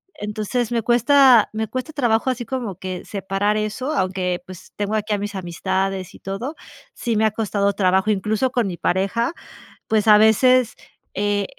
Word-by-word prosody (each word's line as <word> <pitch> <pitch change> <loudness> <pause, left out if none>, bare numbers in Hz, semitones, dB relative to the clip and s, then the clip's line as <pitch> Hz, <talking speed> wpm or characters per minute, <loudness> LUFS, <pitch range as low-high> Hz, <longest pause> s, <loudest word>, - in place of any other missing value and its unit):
entonces 215 +3 -3
me 230 -2 0
cuesta 245 0 +5
me 220 0 -2
cuesta 255 +7 -5
trabajo 240 -3 +1
así 245 -2 -3
como 245 -8 -4
que 185 -1 -6
separar 200 +1 -1
eso, 235 +8 -3
aunque, 185 - -1
pues, 185 -1 -12
tengo 205 +1 -3
aquí 215 0 -2
a - - +1
mis 205 0 -4
amistades 190 +1 -3
y - - -14
todo, 215 +10 -5 0.4
sí 235 - -2
me 220 - +2
ha 220 - +2
costado 200 -2 0
trabajo, 190 +2 +2
incluso 215 +5 0
con 235 -5 0
mi 175 -2 -5
pareja, 200 - 0 0.6
pues, 220 0 +1
a 210 - +9
veces, 240 +3 +4 0.4
eh, 205 0 0
210 Hz, 170 wpm, -21 LUFS, 195-235 Hz, 0.6 s, a